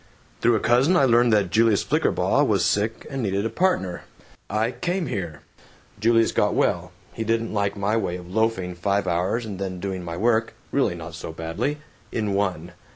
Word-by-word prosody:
"Through 120 0 +4
a - - +2
cousin 130 - +3
I 140 - +5
learned 120 -1 +4
that 100 -4 +2
Julius 110 -2 +3
Flickerbaugh - - +2
was - - +2
sick 110 +2 0
and 135 -1 -3
needed 100 -1 -1
a 115 - -1
partner. 135 - 0 0.5
I 110 +3 0
came 180 +4 -2
here. 90 - -4 0.6
Julius 115 +1 +3
got - - +1
well. - - +1 0.2
He 115 - -3
didn't 115 0 -1
like 100 -1 0
my 100 +2 0
way 95 -5 -1
of 90 0 -11
loafing 110 -5 0
five 100 +3 0
hours 95 +7 0
and 100 -3 -6
then 95 -2 -4
doing 95 -1 -4
my 85 -1 -5
work 110 +2 +1 0.2
(really - - +1
not 85 0 -8
so 80 0 -6
badly) 80 - -3 0.3
in 105 -3 -1
one. 90 -4 -1
105 Hz, 185 wpm, -24 LUFS, 90-115 Hz, 0.6 s, I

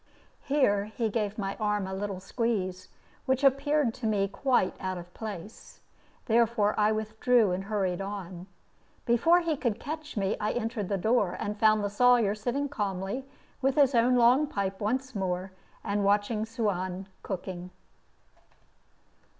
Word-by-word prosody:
Here 260 -9 +2
he 220 +1 -2
gave 210 -2 -2
my 195 -2 -3
arm 210 -2 0
a 190 - -5
little 195 -1 -3
squeeze, 190 -3 -2 0.4
which 260 +1 +1
appeared 275 -1 +3
to 255 -3 -4
me 200 -2 +1
quite 250 0 +1
out 185 -1 -3
of 175 0 -10
place; 210 -2 -8 0.5
therefore 225 -2 +3
I 210 0 +3
withdrew 220 0 +2
and 185 +2 -2
hurried 195 -3 -1
on. 190 -2 -6 0.6
Before 325 +9 +4
he 330 -2 0
could 235 -6 -2
catch 305 0 -6
me 195 0 +1
I 210 - -1
entered 225 -4 -3
the 200 - 0
door, 210 -1 +1
and 210 - -3
found 215 0 +3
the - - +1
Sawyer 240 -2 +4
sitting 245 +7 -2
calmly 205 0 -3 0.3
with 270 0 +2
his 280 -2 +4
own 245 +1 +4
long 250 +5 +5
pipe 195 -7 -3
once 255 +5 -1
more, 185 -2 -2 0.3
and 200 0 -1
watching 205 +2 +1
Suan 190 -5 -2 0.2
cooking. 180 -2 -5
215 Hz, 150 wpm, -28 LUFS, 195-245 Hz, 0.6 s, long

